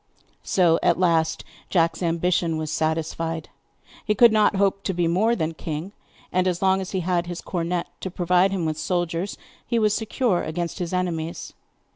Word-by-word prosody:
So 170 -3 +3
at 170 - +3
last 165 -3 +1 0.3
Jack's 165 -1 +1
ambition 170 -1 +1
was 155 -1 -3
satisfied. 160 0 -2 0.5
He 210 - 0
could 235 +2 +7
not 215 -1 +3
hope 195 0 +1
to 190 - -1
be 175 -1 +1
more 210 +8 +2
than 160 -5 -2
king, 160 +3 -5 0.4
and 185 0 +1
as 175 -1 0
long 190 0 +2
as 185 - -5
he 190 - -2
had 175 0 0
his 175 -1 -5
cornet 175 -1 -2
to 190 - -4
provide 180 +1 +2
him 190 -4 -2
with 155 -1 -2
soldiers 175 +2 -2 0.3
he 235 - -1
was 215 -2 +3
secure 220 -3 0
against 170 +3 -4
his 175 -2 -3
enemies. 170 -3 -3
175 Hz, 175 wpm, -24 LUFS, 165-190 Hz, 0.5 s, could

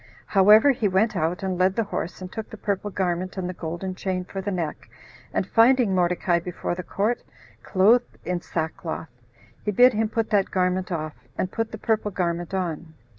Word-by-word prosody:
However, 210 +7 +6
he 235 -5 0
went 200 +3 +2
out 170 +2 -1
and 185 -2 -2
led 185 +1 +3
the 230 - +1
horse, 185 -3 -4
and 185 0 -7
took 220 - -6
the 220 - -9
purple 205 0 -2
garment, 185 -1 -2
and 185 -1 -2
the 180 - -4
golden 175 +3 -4
chain 185 -1 -3
for 195 +1 -5
the 195 - -3
neck, 170 -10 -4 0.4
and - - 0
finding 230 0 +4
Mordecai 175 0 +2
before 175 0 -4
the 180 - -4
court, 210 +6 -1 0.4
clothed 220 +6 +3
in 180 -1 -1
sackcloth, 160 0 -4 0.5
he - - -2
bid 245 +5 +6
him 215 0 0
put 225 0 -1
that 200 -2 +3
garment 185 0 0
off, 155 -3 -3 0.2
and 185 - -1
put 225 -1 -2
the 220 - -6
purple 215 -1 0
garment 175 -2 -2
on. 170 -4 -3
185 Hz, 190 wpm, -24 LUFS, 175-210 Hz, 0.5 s, However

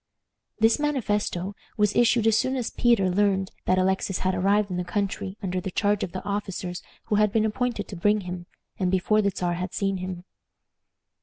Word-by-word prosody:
This 225 +5 +4
manifesto 210 -10 -1 0.2
was 210 -1 +2
issued 240 -1 +4
as 225 -1 +5
soon 260 +4 +1
as 250 -3 -2
Peter 235 -6 +3
learned 190 0 +1
that 185 - +3
Alexis 190 0 +1
had 185 - +2
arrived 200 +2 +2
in 180 - -2
the 180 - -1
country 195 +1 -3
under 185 -1 -1
the 190 - -4
charge 205 +2 +1
of 175 - -3
the 185 - -5
officers 195 -3 -3 0.2
who 210 - 0
had 210 -1 +3
been 220 0 +2
appointed 225 -1 -1
to 200 - -6
bring 210 +4 +2
him, 180 -1 -6 0.3
and 185 -2 +1
before 190 +3 +2
the 200 - +2
Czar 175 -2 -2
had 180 +2 -4
seen 195 -2 0
him. 185 -1 -5
200 Hz, 190 wpm, -26 LUFS, 185-215 Hz, 0.3 s, as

